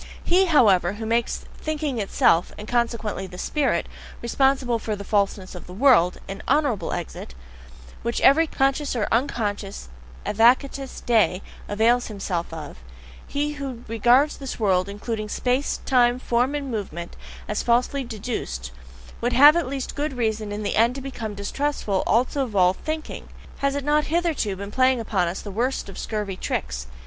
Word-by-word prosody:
He, 370 +2 +4
however, 200 - +4
who 220 +2 -6
makes 230 +1 0
thinking 300 -5 -2
itself, 180 -4 +2
and 210 - -8
consequently 230 -5 -1
"the 180 0 -11
spirit," 290 +7 0 0.3
responsible 255 0 +1
for 215 -1 -3
the 200 - -7
falseness 200 -2 0
of 180 - -10
the 180 - -9
world 225 -7 +4
an 195 +1 -6
honourable 280 -6 +1
exit, 165 - -6 0.7
which 235 +1 -1
every 320 +5 +6
conscious 275 0 0
or 225 - 0
unconscious 210 - -2 0.4
advocatus 260 +5 +2
dei 220 -5 +2 0.3
avails 230 +4 +2
himself 190 -5 -3
of 155 -3 -8 0.5
he 290 +1 -1
who 270 -5 -6
regards 240 +6 +3
this 270 -3 -6
world, 190 -3 +2
including 215 +1 -4
space, 255 +5 0
time, 245 -2 +4
form, 250 +2 0
and 280 -3 -3
movement, 175 -6 -5 0.3
as 210 - -1
falsely 250 +3 +1
DEDUCED, 210 - -5 0.5
would 240 +1 0
have 290 +5 +8
at 340 -6 0
least 270 -1 -4
good 295 0 -2
reason 220 -3 -1
in 210 +1 -4
the 205 - -1
end 230 +3 +4
to 275 - -5
become 225 -6 -6
distrustful 205 -1 -1
also 255 +4 +2
of 230 -5 -6
all 180 -1 +5
thinking; 310 +9 -6 0.3
has 275 0 0
it 285 - -2
not 295 +1 +2
hitherto 320 - 0
been 200 +1 -7
playing 260 0 +3
upon 200 -6 0
us 175 +3 -4
the 205 - -6
worst 245 +5 -1
of 195 - -8
scurvy 210 -3 -3
tricks? 65 - -3
235 Hz, 160 wpm, -24 LUFS, 200-270 Hz, 0.7 s, have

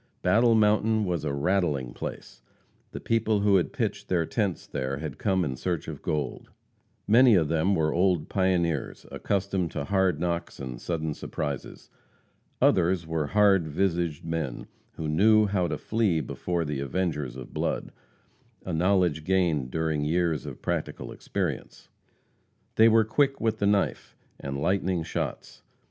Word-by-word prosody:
Battle 115 +5 +4
Mountain 110 0 +3
was 90 -4 -2
"a 75 - -1
rattling 70 -4 0
place;" - - -8 0.5
the - - -6
people 110 -2 +1
who 100 -1 +4
had 90 - 0
pitched - - -3
their 85 -3 +1
tents 100 -1 -2
there 65 -1 -3
had 80 +1 -6
come 95 -4 +1
in 65 -3 -3
search 85 +4 -3
of - - -7
gold. 75 -4 -3 0.6
Many 120 +1 +6
of 80 -5 +2
them 85 +5 +2
were 80 -3 +1
old 90 -3 +2
pioneers, 90 -6 0
accustomed 95 -3 -1
to - - -3
hard 95 -2 +1
knocks 85 0 -3
and 65 -3 -6
sudden 80 -3 -2
surprises. 70 -1 -6 0.7
Others 90 -1 +3
were 80 -2 -2
"hard 100 -4 +4
visaged 85 -1 -1
men," 80 -6 -3 0.3
who 80 - -5
knew 105 +7 +4
how 95 -3 0
to - - -3
flee 105 -7 0
before 85 +3 -3
the 75 -2 -3
avengers 75 -3 -2
of 65 -2 -9
blood - - -2 0.7
a 90 - -3
knowledge 90 -2 +2
gained 85 -7 +1
during 80 0 -1
years 80 0 0
of - - -9
practical - - -3
experience. - - -4 0.8
They 110 - +6
were 110 0 +4
quick 135 +5 +1
with 110 -1 0
the 100 - +2
knife, 100 -1 0 0.2
and 70 0 -4
"lightning 95 +1 0
shots." 80 - -5
85 Hz, 150 wpm, -27 LUFS, 75-100 Hz, 0.8 s, Many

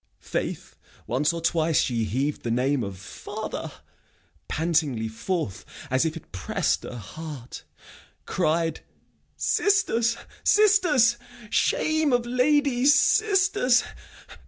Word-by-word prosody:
Faith, - - -5 0.3
once 145 +6 +1
or 170 - -4
twice 165 -1 +1
she 115 -3 0
heav'd 135 +7 -2
the 120 - -4
name 125 +2 +1
of 100 -2 -6
father 95 - -7 0.8
Pantingly 150 -8 0
forth, 110 - -3 0.3
as 130 +4 +2
if 160 0 -2
it 165 - -14
press'd 95 -1 -1
her - - -7
heart; 135 - -9 0.6
Cried 165 +1 0 0.6
'Sisters, 235 - +1 0.3
sisters! 355 - +4 0.3
Shame 315 - +1
of 245 -1 +2
ladies! 270 +2 +3
Sisters! 375 - +3
165 Hz, 105 wpm, -25 LUFS, -, 0.8 s, sisters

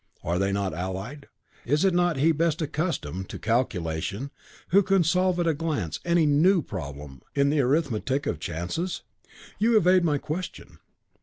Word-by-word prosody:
"Are 85 +2 -1
they 95 0 +1
not 100 -3 -1
allied? 95 - -5 0.4
Is 150 +8 +1
it 190 - +3
not 175 -3 +2
he 155 +5 +4
best 165 +1 0
accustomed 140 - -3
to - - -6
calculation 105 - -1 0.4
who 195 +3 +6
can 195 -2 +3
solve 180 +2 +2
at 175 - +1
a 165 - +3
glance 145 - -2
any 170 -2 +3
new 160 +4 +4
problem 70 -6 -7
in 140 0 +3
the 150 - +1
arithmetic 135 0 0
of 145 - -2
chances?" 90 - -3 0.6
"You 225 +2 +4
evade 185 -2 +4
my 150 -3 +2
question." 170 +6 -6
145 Hz, 160 wpm, -26 LUFS, -, 0.6 s, who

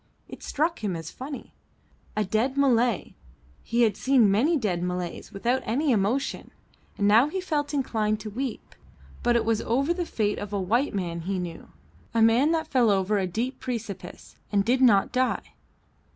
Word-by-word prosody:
It - - -11
struck 315 -2 -1
him 195 -4 -1
as 165 0 -6
funny. 270 +2 -8 0.6
A 215 - +2
dead 230 +8 0
Malay; 245 -3 +2 0.5
he 235 +1 +1
had 220 -3 +2
seen 255 -6 +4
many 285 +12 +3
dead 195 -9 -1
Malays 180 -1 -4
without 240 +6 0
any 275 +6 0
emotion; 230 +5 0 0.5
and 205 - +2
now 225 +6 +6
he 375 +5 -3
felt 300 -6 -2
inclined 220 -7 0
to 215 0 -6
weep, 255 +1 -5 0.5
but 240 0 +2
it 230 -1 +2
was 225 -1 +1
over 275 +8 +1
the 350 -1 -3
fate 210 -2 -1
of 205 - -6
a 200 - 0
white 225 +8 0
man 170 -3 -2
he 190 +3 -3
knew; 175 -2 -6 0.5
a 225 - +3
man 235 +6 +4
that 320 -1 0
fell 250 -6 +3
over 200 +1 +2
a 190 - 0
deep 235 +9 -3
precipice 225 -8 -6
and 200 -1 +2
did 255 +2 +2
not 210 -6 +5
die. 255 0 -1
230 Hz, 180 wpm, -26 LUFS, 200-265 Hz, 0.6 s, now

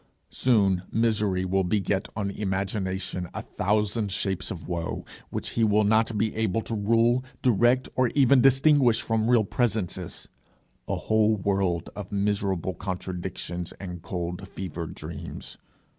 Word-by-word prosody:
Soon, 100 -7 +3
misery 105 -5 +1
will 95 +1 +1
beget 95 +1 0
on 100 -2 -2
imagination 95 -2 -2
a - - -4
thousand 105 +1 0
shapes 95 -1 -2
of 85 -4 -7
woe, 85 -1 -3 0.2
which - - -4
he 115 - +1
will 105 0 +4
not 110 +1 +2
be 110 +1 0
able 110 -1 0
to 115 - -5
rule, 115 +4 +3 0.2
direct, 125 +2 +3
or 130 -1 +3
even 135 -2 +6
distinguish 135 -2 +5
from 110 0 0
real 120 -3 +5
presences 100 -6 -2 0.6
a - - 0
whole 110 0 +2
world 95 -3 0
of 100 -2 -7
miserable 100 -3 0
contradictions 90 -1 -5
and 90 -3 -8
cold 90 +2 -4
fever 90 -4 -5
dreams. 80 +1 -8
100 Hz, 135 wpm, -26 LUFS, 95-110 Hz, 0.6 s, even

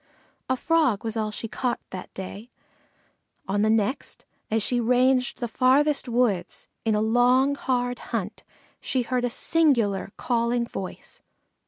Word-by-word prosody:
A 260 - +2
Frog 305 -9 +2
was 225 0 -2
all 215 -1 -1
she 215 +2 -5
caught 245 +2 -2
that 185 - -7
day. 200 +5 -7 1.0
On 200 +1 0
the 215 - +3
next, 220 +4 -1 0.2
as 220 -1 +1
she 245 +2 +1
ranged 250 +2 +2
the 240 - -3
farthest 265 +4 +2
woods 230 -7 0 0.2
in 220 -2 +1
a 210 - +1
long, 245 +5 +3
hard 245 -3 -1
hunt, - - -4 0.4
she 255 -2 -1
heard 250 +1 -1
a - - 0
singular 240 - +1
calling 235 0 0
voice. 190 -5 -8
245 Hz, 145 wpm, -25 LUFS, 220-255 Hz, 1.0 s, the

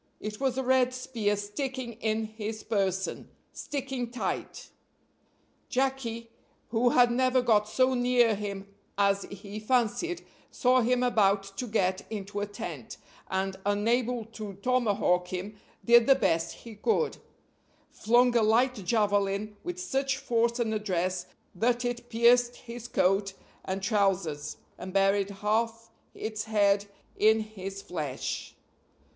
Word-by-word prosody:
It 210 0 -6
was 265 -2 0
a 265 - 0
red 255 0 +3
spear 230 -5 -1
sticking 245 +4 -4
in 220 0 0
his 215 0 -6
person 195 -3 -1 0.2
sticking 265 -4 -4
tight. 245 - -4 1.0
Jacky, 245 -3 -1 0.4
who 240 +2 +3
had 245 0 +5
never 255 +1 +3
got 215 -4 +3
so 260 +3 +3
near 245 -2 +3
him 200 -1 -5 0.3
as 200 0 +2
he 200 +1 -8
fancied, 255 - 0 0.2
saw 255 0 +3
him 250 +1 +2
about 205 -5 +3
to 245 +5 -4
get 190 -4 0
into 205 -1 -5
a 205 - -2
tent, 205 - -7 0.3
and, 190 0 -1
unable 230 +3 +1
to 215 -2 -8
tomahawk 210 -8 +2
him, 195 +4 -6 0.3
did 235 0 +6
the 270 - +7
best 170 -8 +1
he 230 - -11
could 450 - 0 0.7
flung 240 +2 +3
a 235 - +5
light 235 +4 +3
javelin 205 0 +1
with 355 0 -5
such 270 -7 -1
force 235 -3 +1
and 230 -3 0
address 185 -3 -1 0.3
that 240 +5 +1
it 240 0 -3
pierced 240 +1 +4
his 240 -1 -9
coat 195 -2 +1 0.3
and 190 0 -3
trousers 195 -8 0 0.2
and 185 - -7
buried 195 0 +3
half 225 +3 -1 0.2
its 215 -1 -4
head 205 -2 +2 0.3
in 220 +1 +4
his 195 -2 -7
flesh. 150 -7 -4
220 Hz, 130 wpm, -28 LUFS, 200-245 Hz, 1.0 s, the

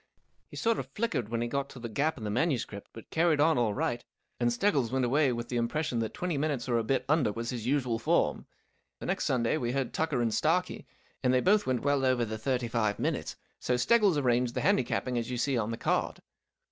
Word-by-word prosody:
He - - -12
sort 230 -1 +1
of 130 - -5
flickered 210 - -1
when 115 0 -1
he - - -2
got 140 +3 -2
to 130 - -11
the 120 - -5
gap 140 +9 -1
in 115 - -8
the 105 - -2
manuscript, 125 -6 -1
but 115 - -13
carried 165 -2 +2
on 155 -2 +4
all 110 -4 +1
right, 120 +3 -1 0.4
and 120 -1 +2
Steggles 130 - +1
went 130 -1 +1
away 140 +2 +3
with 120 0 -4
the 120 - -2
impression 120 +2 -1
that 110 -1 -2
twenty 175 -5 -2
minutes 140 -5 -1
or 120 -2 +2
a - - -1
bit 130 +4 0
under 145 -6 +2
was 115 +2 -4
his 120 -2 -5
usual 125 -4 +1
form. - - +1 0.5
The - - -7
next - - -1
Sunday 120 +3 +1
we 120 -4 -2
heard 135 -2 -2
Tucker 155 -5 0
and 115 - +1
Starkie, 175 +4 0 0.3
and 125 - +2
they 130 - +4
both 205 +9 +3
went 130 -2 0
well 145 -1 +2
over 130 -2 +2
the 110 0 -5
thirty 125 0 -1
five 110 -3 0
minutes, - - -2 0.2
so 125 - 0
Steggles 205 - +4
arranged 125 -3 +1
the - - 0
handicapping 130 -9 +1
as 115 - -4
you 125 - -3
see 135 +3 0
on 115 -2 0
the 115 - -3
card. - - -1
125 Hz, 235 wpm, -29 LUFS, 120-145 Hz, 0.5 s, on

